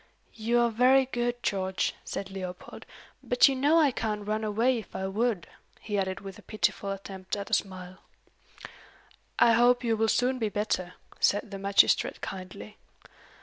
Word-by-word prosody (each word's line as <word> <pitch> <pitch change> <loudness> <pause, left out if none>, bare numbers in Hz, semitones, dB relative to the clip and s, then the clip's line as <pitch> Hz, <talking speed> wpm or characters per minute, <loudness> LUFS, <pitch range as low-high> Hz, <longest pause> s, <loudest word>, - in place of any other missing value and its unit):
"You 230 +2 0
are 235 -1 +2
very 255 +4 +4
good, 240 -1 -3
George," 190 -1 -1
said 195 -1 -6
Leopold. 185 -2 -8 0.3
"But 245 - +4
you 275 - +1
know 285 +5 +3
I 300 -4 +4
can't 210 -3 -3
run 215 +1 -1
away 230 +4 +1
if 215 - -13
I 190 - -3
would," 205 -1 -1 0.3
he 210 - -5
added 190 -1 -2
with 195 -2 -9
a - - -13
pitiful 215 -2 -1
attempt 195 -1 -5
at 200 -1 -7
a - - -4
smile. 185 -1 -2 1.4
"I 235 - +6
hope 245 +2 +4
you 230 -2 +1
will 220 0 +1
soon 255 +3 +1
be 220 -2 0
better," 200 -4 -2 0.2
said 205 +2 +1
the 195 - -6
magistrate 200 0 +3
kindly. 195 +3 -8
210 Hz, 165 wpm, -28 LUFS, 195-240 Hz, 1.4 s, I